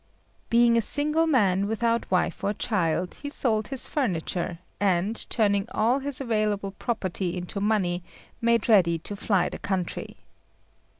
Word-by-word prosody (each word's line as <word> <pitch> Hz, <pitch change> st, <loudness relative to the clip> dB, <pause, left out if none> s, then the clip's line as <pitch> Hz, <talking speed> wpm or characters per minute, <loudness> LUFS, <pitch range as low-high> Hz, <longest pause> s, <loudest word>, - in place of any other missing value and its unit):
Being 235 Hz, 0 st, +5 dB
a -, -, +4 dB
single 300 Hz, +7 st, +1 dB
man, 200 Hz, -9 st, +3 dB
without 230 Hz, +2 st, 0 dB
wife 185 Hz, -1 st, 0 dB
or 205 Hz, -, +1 dB
child, 180 Hz, -5 st, -1 dB
he 285 Hz, -, -4 dB
sold 220 Hz, -7 st, 0 dB
his 270 Hz, -2 st, +1 dB
furniture, 180 Hz, -, -2 dB, 0.2 s
and, 195 Hz, +2 st, +1 dB
turning 200 Hz, -3 st, +1 dB
all 235 Hz, +5 st, +2 dB
his 280 Hz, -1 st, -4 dB
available 215 Hz, -5 st, -1 dB
property 190 Hz, -4 st, -3 dB
into 180 Hz, +3 st, -4 dB
money, 190 Hz, -4 st, +1 dB, 0.4 s
made 235 Hz, -1 st, +2 dB
ready 180 Hz, -7 st, +5 dB
to 205 Hz, +5 st, -7 dB
fly 195 Hz, -3 st, +1 dB
the -, -, -7 dB
country. 190 Hz, -3 st, -3 dB
210 Hz, 140 wpm, -26 LUFS, 185-235 Hz, 0.4 s, Being